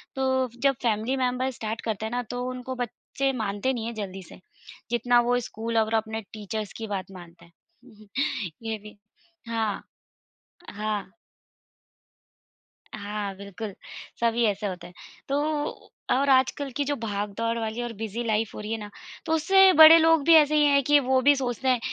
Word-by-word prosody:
तो 260 -1 +1 0.2
जब 275 -1 +4
family 225 +3 0
member 255 +1 0
start 225 -1 -5
करते 220 -1 -2
हैं 220 - -4
ना 245 0 -1
तो 245 0 -3
उनको 255 0 -6
बच्चे 255 +2 -3
मानते 220 +2 -1
नहीं 230 -2 -4
हैं, 235 - -4
जल्दी 195 -3 -6
से। - - -13 0.5
जितना 240 0 +3
वो 245 0 +3
स्कूल 230 +1 -3
और 220 0 +1
अपने 220 0 -2
टीचर्स 215 -1 -5
की 225 -1 -5
बात 195 -2 -4
मानते 175 -2 -13
हैं। 215 +5 -21 0.6
ये 220 - -2
भी। 210 0 -12 0.5
हाँ। 220 -3 -2 0.9
हाँ। 210 -2 -4 1.8
हाँ, 205 -1 -5
बिल्कुल। 200 +1 -7 0.5
सभी 235 0 +1
ऐसे 205 0 0
होते 175 -2 -6
हैं। 175 - -16 0.4
तो 275 - +1 0.8
और 275 +2 +2
आजकल 265 +2 +2
कि 290 - +1
जो 290 +1 -1
भागदौड़ 210 +2 -2
वाली 225 +1 -3
और 240 -1 -5
बिजी 220 +2 -4
लाइफ़ 220 -1 0
हो - - -7
रही 210 +1 -6
है 225 - -1
ना 210 - -8 0.4
तो 320 - 0
उससे 385 +4 +6
बड़े 315 +1 +10
लोग 325 -2 +4
भी 335 - +7
ऐसे 305 -1 +5
ही 300 - +5
है 280 -1 +4
कि 295 +2 +5
वो 260 -1 +2
भी 285 +2 +5
सोचते 260 -1 -3
हैं 255 -2 +3
230 Hz, 170 wpm, -26 LUFS, 210-260 Hz, 1.8 s, बड़े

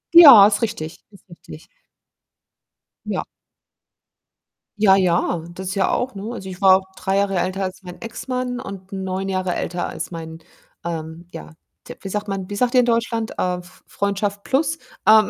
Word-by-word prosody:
Ja, 280 -12 +11
ist 210 0 0
richtig, 165 -8 -4
ist 200 -2 -20
richtig. 80 - -13 1.4
Ja. - - -2 1.5
Ja, 200 -2 +6
ja, 175 -3 +1
das 185 +1 -7
ist 190 - -3
ja 195 - +2
auch, 255 -1 -1
ne? 195 - -6
Also 190 -5 -7
ich 180 - -8
war 190 -1 +6 0.2
3 190 +1 0
Jahre 195 -2 +1
älter 185 +2 -1
als 190 +1 -5
mein 180 +5 -10
Ex-Mann 250 +2 -4
und 195 -3 -9
9 190 0 -3
Jahre 185 -1 -1
älter 175 +1 -3
als - - -5
mein, 160 -1 -8 0.4
ähm, 165 0 -6
ja, 75 0 -9 0.4
d - - -8
wie 195 - -6
sagt 210 +2 -3
man, 195 -1 -4
wie 205 - -4
sagt 245 +3 +1
ihr 255 - +6
in 245 - +4
Deutschland? 230 -1 0
Äh, 180 0 0
F 180 +1 -16
Freundschaft 200 0 -2
plus, 310 +4 0 0.3
ähm, 215 -1 +7
195 Hz, 175 wpm, -21 LUFS, 180-215 Hz, 1.5 s, Ja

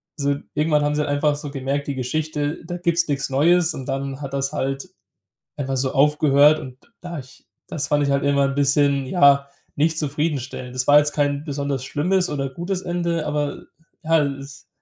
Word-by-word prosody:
So 140 0 0 0.2
irgendwann 150 0 +2
haben 145 0 0
sie 150 0 0
einfach 145 +1 +1
so 145 -1 -7
gemerkt, 140 +1 -3
die 140 - -2
Geschichte, 150 +4 -2
da 175 +1 -5
gibt's 170 -1 +1
nichts 140 -1 -1
Neues. 165 +5 +3
Und 130 - -7
dann 135 0 -4
hat 135 -1 -6
das 135 0 -1
halt 135 0 -3 0.7
einfach 135 -2 -2
so 130 0 0
aufgehört. 150 +1 +4
Und 130 -4 -9 0.2
da 175 -3 -6
ich 130 -1 -14 0.2
das 140 -2 -3
fand 145 0 +2
ich 140 - 0
halt 140 0 +1
immer 140 0 +3
'n 135 - -4
bisschen 140 -1 +2
ja, 140 -3 +4 0.3
nicht 160 +2 +1
zufriedenstellend. 140 -4 -3
Das 125 0 -1
war 145 - +7
jetzt 150 0 0
kein 145 -1 0
besonders 140 -3 -3
schlimmes 180 +7 0
oder 135 -2 -2
gutes 175 +7 -4
Ende. 170 -3 -2
Aber 150 -1 -2 0.4
ja, 160 -1 +3
es 140 0 -6
145 Hz, 185 wpm, -22 LUFS, 135-155 Hz, 0.7 s, war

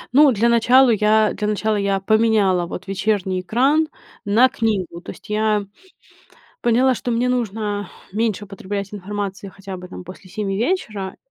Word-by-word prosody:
Ну, 290 -2 +7
для 230 +1 +2
начала 245 +2 +5
я 215 0 +3
для 210 +1 -3
начала 215 +1 0
я 200 -1 0
поменяла 205 -4 +2
вот 180 - -7
вечерний 195 -1 -1
экран 275 - +2 0.4
на 220 +5 +5
книгу. 210 -9 -2
То - - -8
есть - - -15
я 210 -1 +1 1.0
поняла, 250 +2 +3
что 245 - -3
мне 245 +2 +1
нужно 210 -5 -2 0.2
меньше 210 0 -1
употреблять 200 +1 -5
информации 200 0 -5
хотя 195 0 -8
бы, 180 0 -9
там, 180 - -9
после 185 +1 -12
7 195 0 -3
вечера, 215 - -2
210 Hz, 155 wpm, -21 LUFS, 195-230 Hz, 1.0 s, Ну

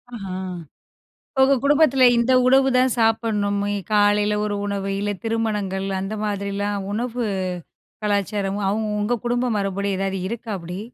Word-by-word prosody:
ஆஹ. 200 - -7 1.2
உங்க 270 +1 +6
குடும்பத்துல 285 -3 +4
இந்த 235 +2 +2
உணவு 265 +1 +5
தான் 255 -1 +3
சாப்பிடணும், 215 -3 +1
ஏ 205 - -1 0.2
காலையில 205 0 +3
ஒரு 210 -1 -2
உணவு, 195 -1 -2
இல்ல 205 0 -1
திருமணங்கள் 210 -4 -1
அந்த 195 +3 -4
மாதிரிலாம் 200 -1 -2
உணவு 240 +2 -2 0.8
கலாச்சாரமும் 200 -1 -1
அவங்க 215 +2 -1
உங்க 235 +3 0
குடும்ப 245 +1 0
மரபுப்படி 200 0 -1
ஏதாவது 195 0 -2
இருக்கா, 230 +2 -6
அப்டி? 175 +1 -7
210 Hz, 130 wpm, -22 LUFS, 200-235 Hz, 1.2 s, உங்க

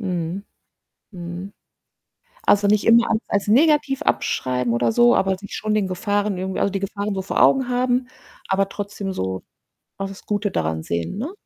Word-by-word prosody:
Mhm, 180 -1 -3 0.7
mhm. 175 +1 -7 1.0
Also, 205 0 +4
nicht 210 0 +3
immer 230 +1 +5
alles 220 +1 0
als 200 0 -1
negativ 275 +3 +3
abschreiben 125 -2 0
oder 120 -1 +2
so, 240 0 +5
aber 190 0 +2
sich 200 - -8
schon 215 0 -1
den 205 -3 +1
Gefahren 205 +1 -1
irgendwie 190 +1 -3
also, 200 - +1
die 195 - -2
Gefahren 200 +1 -3
so 190 - -2
vor - - 0
Augen 265 -2 +4
haben, 250 0 +1 0.4
aber 195 0 +1
trotzdem 200 -1 -5
so 95 - -3 0.5
auch 195 0 -3
das 195 0 -12
Gute 205 0 -1
daran 80 - -2
sehen, 85 - -3
ne? 290 - -4
200 Hz, 175 wpm, -22 LUFS, 185-215 Hz, 1.0 s, immer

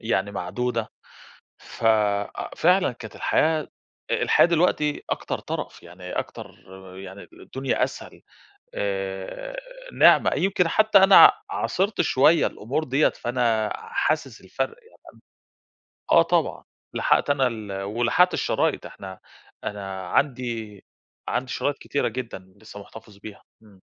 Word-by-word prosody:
يعني 100 -3 -1
معدودة، 115 +5 -3 0.7
ف 115 - -10 0.7
فعلًا 180 -3 +3
كانت 115 -3 -11
الحياة، 155 -1 +1 0.4
الحياة - - +4
دلوقتي 160 -3 +1
أكتر - - -3
ترف - - -6
يعني، 90 +1 -10
أكتر - - -6 0.4
يعني، 95 +1 -10
الدنيا 135 -1 -2
أسهل، - - -9 0.5
آآ، 95 - -4 0.4
نعمة، - - +5
يمكن 185 -3 +1
حتى 215 +2 +4
أنا 195 0 +9 0.2
عاصرت 200 - -1
شوية 155 +5 +4
الأمور 135 +9 -3
ديّة، 135 +3 +2
فأنا 120 -3 -1
حاسس 455 +2 -2
الفرق 455 - -4
يعني 460 - -22 1.2
أ - - +5
آه - - +8
طبعًا، - - 0 0.3
لحقت - - +1
أنا 135 -3 +3
ال 105 -4 -5
ولحقت 120 - +2
الشرايط، - - 0
إحنا، 95 -1 -10 0.4
أنا 95 -2 -6
عندي 115 -5 -2 0.4
عندي 125 +1 -2
شرايط 145 -1 -1
كتيرة 140 - -2
جدًا، 105 -7 -7
لسه 105 -1 -11
محتفظ 105 0 -13
بيها. 100 +1 -11 0.2
إمم. 100 -3 -20
120 Hz, 120 wpm, -24 LUFS, 100-155 Hz, 1.2 s, أنا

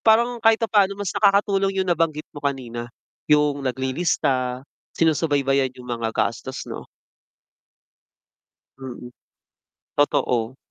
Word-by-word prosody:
parang 235 +2 +3
kahit 225 0 +5
papaano 205 -3 +2
mas 205 -3 -3
nakakatulong 195 -1 +2
yung - - -8
nabanggit 155 -2 0
mo 145 - -9
kanina 125 -4 -3 0.4
yung 150 -1 +3
naglilista, 130 -1 0 0.3
sinusubaybayan 140 -4 +2
yung 125 0 -11
mga 115 -1 -2
gastos, - - -2
'no? - - -8 1.9
Mm, 125 -2 -8 0.9
totoo. 130 -4 +1
145 Hz, 100 wpm, -23 LUFS, 130-195 Hz, 1.9 s, kahit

